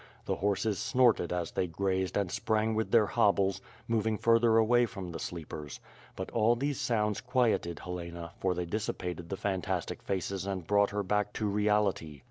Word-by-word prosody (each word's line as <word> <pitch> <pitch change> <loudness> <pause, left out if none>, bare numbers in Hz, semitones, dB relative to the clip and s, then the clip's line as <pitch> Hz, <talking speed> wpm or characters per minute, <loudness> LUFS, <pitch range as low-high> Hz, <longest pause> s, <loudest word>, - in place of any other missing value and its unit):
The - - -1
horses 100 +1 0
snorted 125 -8 +3
as 90 -2 -2
they 90 - -1
grazed 95 +2 -1
and 100 -3 0
sprang 110 0 0
with 110 0 -1
their 115 -3 +5
hobbles, 100 -2 +2 0.3
moving 110 -1 +1
further 115 0 +4
away 120 +2 +4
from 95 -6 -7
the 85 - -6
sleepers; 75 -4 -6 0.4
but - - -5
all 115 +1 +3
these 140 +2 -2
sounds 105 -3 0
quieted 120 - +1
Helena 85 -1 -6
for 95 -1 0
they 90 0 -2
dissipated 90 -3 -4
the 95 - -3
fantastic 95 -4 -2
faces 95 0 -3
and 95 -3 -3
brought 100 +2 +3
her 105 0 -2
back 105 +1 0
to 110 - -2
reality. 105 -7 +1
100 Hz, 170 wpm, -30 LUFS, 90-110 Hz, 0.4 s, their